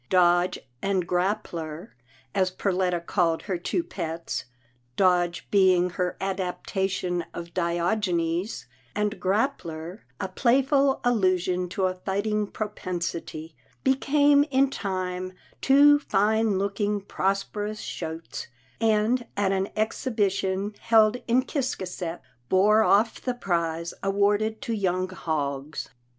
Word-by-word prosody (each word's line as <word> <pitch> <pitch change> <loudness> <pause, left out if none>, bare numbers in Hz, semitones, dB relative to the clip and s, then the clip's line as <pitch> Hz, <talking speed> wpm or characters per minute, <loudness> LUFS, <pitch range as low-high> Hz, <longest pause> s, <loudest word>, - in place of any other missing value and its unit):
Dodge 175 0 +4 0.2
and 195 -3 0
Grap 190 +5 +1
pler, 165 +4 -7 0.4
as 190 -2 +2
Perletta 185 -1 0
called 170 -4 +1
her 185 -4 -2
two 335 - -1
pets 165 - -4 0.3
— 120 0 -40
Dodge 175 -2 +2
be 190 -2 +5
ing 180 0 +1
her 180 0 -2
adaptation 190 -1 -2
of 170 0 -7
Diogenes, 175 +1 0 0.3
and 210 0 -1
Grappler 180 -2 -1 0.2
a 190 - -2
playful 270 +6 +2
allusion 185 -6 +1
to 190 +1 0
a 185 - +1
fighting 205 +3 -1
propensity 175 -6 -5
— - - -36
became 285 +1 +4
in 275 -2 +2
time 185 -3 -3 0.3
two 290 +2 +6
fine 215 -3 +2
looking, 205 +1 -1
prosperous 200 +2 -2
shotes, 165 0 -6 0.3
and 225 +2 +2
at 200 -1 +2
an 195 0 0
exhibition 205 -3 0
held 225 0 +4
in 245 +2 +3
Ciscasset, 185 - -3 0.3
bore 210 +3 +5
off 220 +1 +3
the 250 -1 -2
prize 170 -5 -1
awarded 205 +2 +1
to 230 - -2
young 185 -3 0
hogs. 150 -5 -3
190 Hz, 115 wpm, -26 LUFS, 175-215 Hz, 0.4 s, two